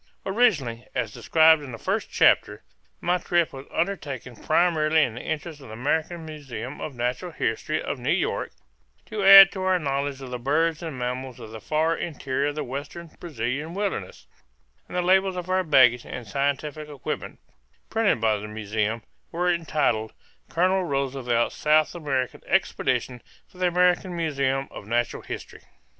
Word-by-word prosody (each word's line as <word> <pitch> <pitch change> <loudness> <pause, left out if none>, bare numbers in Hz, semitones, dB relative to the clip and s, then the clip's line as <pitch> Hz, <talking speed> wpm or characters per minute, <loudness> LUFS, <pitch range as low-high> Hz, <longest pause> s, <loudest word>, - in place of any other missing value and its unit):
Originally, 175 - +1
as 115 -3 -2
described 160 +6 +5
in 140 -3 -8
the 115 - -7
first - - -2
chapter, - - +3 0.4
my 180 +1 +1
trip 175 -1 +1
was 135 0 -9
undertaken 145 - -3
primarily 155 +1 +2
in 115 - -1
the 120 - -7
interest 155 -1 -5
of 135 - -11
the 110 - -9
American 160 +7 -1
Museum 135 -4 -7
of 145 - -5
Natural 125 +8 -2
History 155 +3 -1
of 135 - -4
New 125 - -3
York, - - 0 0.6
to 210 -2 -4
add 195 0 +11
to 190 - -6
our 185 0 +2
knowledge 140 -3 -2
of 130 -2 -9
the 125 - -4
birds 160 +6 +1
and 160 -6 -5
mammals 125 0 -4
of 110 - -10
the 110 -1 -9
far 160 +2 +1
interior 140 -3 -2
of 145 - -3
the 155 - -2
western 145 +6 -7
Brazilian 145 +2 -4
wilderness; 195 - -3 0.6
and - - -5
the 180 - +1
labels 190 +1 +3
of 180 0 -4
our 185 0 +2
baggage 130 -6 +5
and 120 -3 -8
scientific 145 +5 -2
equipment, 145 -3 -5 0.5
printed 225 - +2
by 110 -1 +2
the 105 +1 -7
museum, 110 +1 -2 0.3
were 175 +1 +1
entitled 150 -10 0 0.4
"Colonel 185 +2 +2
Roosevelt's 135 -6 0
South 155 0 +3
American 135 -6 -2
Expedition 125 -2 0 0.3
for 180 - -19
the 180 - +3
American 180 +1 +2
Museum 140 -4 0
of 100 - -10
Natural 120 +1 -1
History." - - -8
145 Hz, 165 wpm, -25 LUFS, 125-170 Hz, 0.6 s, add